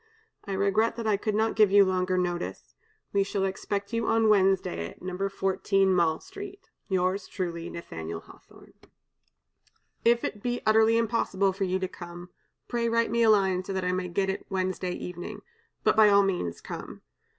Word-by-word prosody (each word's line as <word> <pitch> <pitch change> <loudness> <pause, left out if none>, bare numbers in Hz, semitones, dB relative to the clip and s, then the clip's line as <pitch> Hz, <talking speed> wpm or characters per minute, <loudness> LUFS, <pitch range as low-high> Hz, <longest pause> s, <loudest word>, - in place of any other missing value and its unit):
I 200 - -4
regret 200 +4 +2
that 230 -1 -5
I 215 -2 +3
could 210 +1 -2
not 220 +1 +1
give 215 -2 +5
you 200 0 +6
longer 185 0 0
notice. 175 -1 -3 0.4
We 200 - +3
shall 195 0 -1
expect 200 +2 -3
you 230 -1 0
on 225 -1 +3
Wednesday 190 - +2
at - - -15
No. 185 +2 -2
14 195 0 +1
Mall 165 -3 +2
Street. 400 0 -10 0.2
"Yours 185 0 0
truly, 170 -3 -4
"NATH^L 80 - -7
HAWTHORNE. - - -18 1.3
"If 235 0 +3
it 210 - -4
be 245 +1 -1
utterly 220 +1 +5
impossible 205 -4 +1
for 195 +1 -1
you 185 0 0
to 190 0 -2
come, 175 0 -10 0.4
pray 235 -1 0
write 230 -1 +1
me 235 0 +1
a 225 - +5
line 190 -3 +3
so 195 - -5
that 190 -1 -2
I 180 - +1
may 185 0 -2
get 190 +2 0
it 190 - -7
Wednesday 185 -1 -2
evening. 180 -1 -7 0.4
But - - +3
by 215 -1 +7
all 200 0 +6
means 180 - -2
come. - - -8
195 Hz, 180 wpm, -27 LUFS, 185-215 Hz, 1.3 s, by